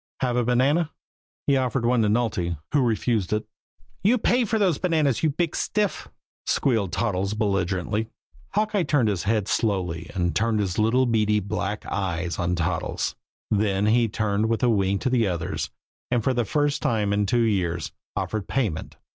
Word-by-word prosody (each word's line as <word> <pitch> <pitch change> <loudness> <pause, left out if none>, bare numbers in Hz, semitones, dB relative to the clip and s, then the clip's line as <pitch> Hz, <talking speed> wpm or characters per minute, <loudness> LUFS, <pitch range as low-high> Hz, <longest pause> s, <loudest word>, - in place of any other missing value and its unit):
Have 125 -2 +1
a 125 - +2
banana?" 135 +7 +2 0.6
He 140 -1 +3
offered 130 -1 0
one 120 0 +3
to 110 - +3
Nulty, 105 -7 0
who 145 - +3
refused 115 -4 0
it. 105 - -1 0.6
"You 225 +6 +4
pay 245 +2 +2
for 220 +1 0
those 190 -8 +2
bananas, 155 - +1
you 160 - +3
big 165 +3 -1
stiff!" 210 -2 -1 0.4
squealed 110 -9 +1
Toddles 100 -2 -1
belligerently. 100 +1 -1 0.4
Hawkeye 210 -1 +1
turned 145 -8 +2
his 95 -4 -1
head 105 -1 +1
slowly 90 -8 -1
and 85 -2 0
turned 115 0 +1
his 95 -2 -1
little 120 +4 +3
beady, 105 -3 +2
black 105 +1 -3
eyes 90 -3 -2
on 90 0 0
Toddles, 85 -1 -1 0.4
then 100 -1 +2
he 115 +2 +4
turned 105 0 0
with 115 +2 0
a 125 - +4
wink 100 -3 +1
to 130 - 0
the 120 -4 +3
others, 85 -3 -2 0.4
and 120 -3 +1
for 130 - +2
the 120 -2 0
first 145 +5 0
time 105 -3 +1
in 105 0 +1
two 120 +3 +2
years 90 -7 0 0.3
offered 110 -3 -2
payment. 105 -12 -2
110 Hz, 170 wpm, -25 LUFS, 100-130 Hz, 0.6 s, You